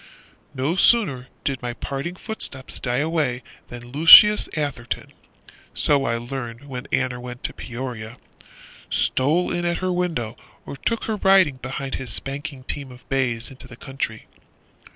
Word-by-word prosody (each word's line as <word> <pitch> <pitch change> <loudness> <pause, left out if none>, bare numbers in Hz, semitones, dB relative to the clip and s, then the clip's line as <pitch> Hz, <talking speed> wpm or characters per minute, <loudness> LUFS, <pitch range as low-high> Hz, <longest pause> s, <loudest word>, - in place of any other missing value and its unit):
No 135 +6 0
sooner 165 - +3 0.2
did 135 -2 -2
my 120 -1 -3
departing 140 +8 -5
footsteps 185 - -5
die 125 -1 -1
away 145 -4 0 0.2
Than 120 0 -10
Lucius 165 +8 +9
Atherton, 140 -5 -3 0.6
(So 140 -2 +2
I 115 0 0
learned 120 0 -6
when 130 -3 -7
Aner 125 -1 0
went 125 0 -8
to - - -2
Peoria) 120 -2 -7 0.7
Stole 155 +7 +1
in 175 - -1
at 170 0 0
her 185 0 -1
window, 165 -11 -2 0.3
or - - -7
took 230 +10 -2
her 220 -1 -2
riding 190 -8 +4
Behind 135 +1 -5
his 130 - -4
spanking 140 0 -5
team 140 0 -6
of 125 +1 -15
bays 120 -3 0
Into 135 0 -12
the 120 -2 -13
country. 135 -5 -5
135 Hz, 150 wpm, -23 LUFS, 125-160 Hz, 0.7 s, Lucius